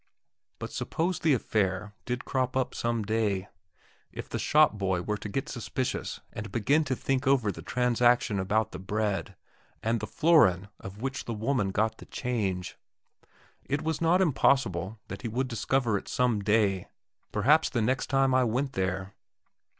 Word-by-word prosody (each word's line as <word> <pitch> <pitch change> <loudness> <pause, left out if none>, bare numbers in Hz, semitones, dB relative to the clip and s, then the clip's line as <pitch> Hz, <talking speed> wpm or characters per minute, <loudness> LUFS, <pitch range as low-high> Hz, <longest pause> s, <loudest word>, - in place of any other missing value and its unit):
But - - -6
suppose 175 +2 -2
the 155 -4 +3
affair 105 -3 -1
did 125 +1 -3
crop 130 -1 -1
up 130 - 0
some 115 -1 -1
day? 105 -3 -1 0.6
If - - -7
the - - -4
shop 155 -3 +4
boy 95 -3 -1
were 105 +2 -2
to 105 - -6
get 130 +7 -2
suspicious 125 +1 -3
and 105 -1 -6
begin 140 +9 +2
to 130 -2 -1
think 135 +1 -1
over 125 -7 +3
the - - -9
transaction 120 -3 +2
about 105 +3 0
the 90 - -7
bread, 100 -2 -2 0.5
and 115 +1 +1
the 105 - -4
florin 115 - +4
of 100 +4 -9
which 135 0 -3
the 115 - -3
woman 110 -1 0
got 110 +3 0
the - - -12
change? 100 -8 -3 0.8
It 140 +1 -2
was 160 +1 -2
not 170 +3 +4
impossible 115 - +1
that 95 +1 -7
he - - -3
would 125 +4 -1
discover 120 -2 0
it - - -16
some 125 -4 +1
day, 100 -2 +1 0.4
perhaps 145 +10 +4
the 120 - -1
next 130 +4 0
time 135 -1 +2
I 130 0 +4
went 130 +4 -1
there. 95 +1 -2
115 Hz, 165 wpm, -28 LUFS, 100-130 Hz, 0.8 s, shop